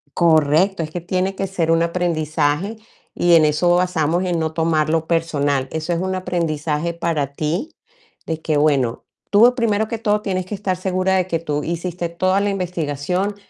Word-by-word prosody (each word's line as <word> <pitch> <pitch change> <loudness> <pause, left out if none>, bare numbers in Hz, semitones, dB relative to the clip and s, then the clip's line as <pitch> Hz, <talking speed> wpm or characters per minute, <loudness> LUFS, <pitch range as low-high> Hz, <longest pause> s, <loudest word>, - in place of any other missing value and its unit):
Correcto, 165 +2 +3
es 155 - -7
que 175 - -4
tiene 185 +2 -1
que 195 0 -2
ser 170 -4 -1
un 165 0 +3
aprendizaje, 165 +1 0 0.4
y 175 -1 +4
en 160 -2 +6
eso 155 +4 +2
basamos, 175 -1 +1
en 175 -2 0
no 160 0 -2
tomarlo 160 0 +1
personal. 145 -5 0
Eso 160 +2 -2
es 170 - -1
un 185 +1 -2
aprendizaje 165 -3 -2
para 160 -5 -2
ti, 170 - -3 0.5
de 160 -1 -4
que 155 -2 0
bueno, 140 -6 +1 0.2
tú, 230 +5 +6
primero 220 -3 +1
que 230 - -3
todo, 210 -1 0
tienes 185 -3 -2
que 210 - -5
estar 195 -2 -2
segura 185 0 0
de 185 -1 +1
que 165 -3 -1
tú 150 -2 -3
hiciste 170 +1 -3
toda 185 +3 +1
la 205 - +1
investigación, 180 +1 -2
170 Hz, 180 wpm, -20 LUFS, 155-185 Hz, 0.5 s, en